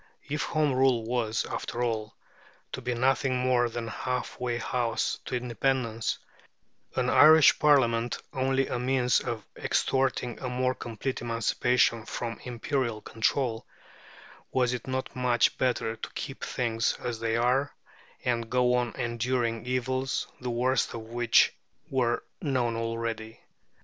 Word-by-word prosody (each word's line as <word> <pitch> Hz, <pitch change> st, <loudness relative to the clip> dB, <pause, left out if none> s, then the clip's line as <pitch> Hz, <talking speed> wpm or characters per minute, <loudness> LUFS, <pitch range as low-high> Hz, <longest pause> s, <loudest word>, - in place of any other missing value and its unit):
If 150 Hz, +1 st, -2 dB
Home 155 Hz, -3 st, +1 dB
Rule 130 Hz, -3 st, +3 dB
was, 115 Hz, -2 st, 0 dB
after 120 Hz, +1 st, -3 dB
all, 110 Hz, -3 st, -2 dB, 0.6 s
to 130 Hz, -, -5 dB
be 125 Hz, 0 st, -2 dB
nothing 130 Hz, +1 st, +2 dB
more 125 Hz, -1 st, +2 dB
than 115 Hz, 0 st, -4 dB
a -, -, -5 dB
half 125 Hz, +2 st, -3 dB
way 120 Hz, -1 st, -1 dB
house 120 Hz, 0 st, -1 dB
to -, -, -3 dB
independence, 120 Hz, -1 st, -1 dB, 0.8 s
an 125 Hz, -1 st, +1 dB
Irish 155 Hz, +3 st, +7 dB
Parliament 120 Hz, -6 st, +3 dB, 0.2 s
only 135 Hz, 0 st, +1 dB
a 125 Hz, -, -3 dB
means 125 Hz, 0 st, +2 dB
of 110 Hz, -4 st, -4 dB
extorting 130 Hz, -2 st, 0 dB
a 130 Hz, -, -4 dB
more 125 Hz, +1 st, +1 dB
complete 120 Hz, +2 st, -4 dB
emancipation 115 Hz, 0 st, +1 dB
from 115 Hz, -1 st, -4 dB
imperial 120 Hz, -1 st, -2 dB
control, 115 Hz, 0 st, -1 dB, 0.8 s
was 125 Hz, -1 st, +2 dB
it 125 Hz, +1 st, -5 dB
not 130 Hz, 0 st, -3 dB
much 125 Hz, -2 st, +2 dB
better 120 Hz, -3 st, 0 dB
to -, -, -7 dB
keep 135 Hz, -, -6 dB
things 115 Hz, -2 st, 0 dB
as 115 Hz, -2 st, -4 dB
they 115 Hz, 0 st, 0 dB
were, 130 Hz, +4 st, +2 dB, 0.5 s
and 115 Hz, -2 st, 0 dB
go 125 Hz, 0 st, +3 dB
on 125 Hz, -1 st, 0 dB
enduring 120 Hz, -1 st, -1 dB
evils, 130 Hz, +1 st, -1 dB
the 125 Hz, -, -4 dB
worst 125 Hz, +1 st, +1 dB
of 115 Hz, -, -5 dB
which 120 Hz, +1 st, +3 dB, 0.4 s
were 125 Hz, -3 st, +1 dB, 0.2 s
known 125 Hz, -6 st, 0 dB
already? 115 Hz, -1 st, -3 dB
125 Hz, 140 wpm, -28 LUFS, 115-130 Hz, 0.8 s, Irish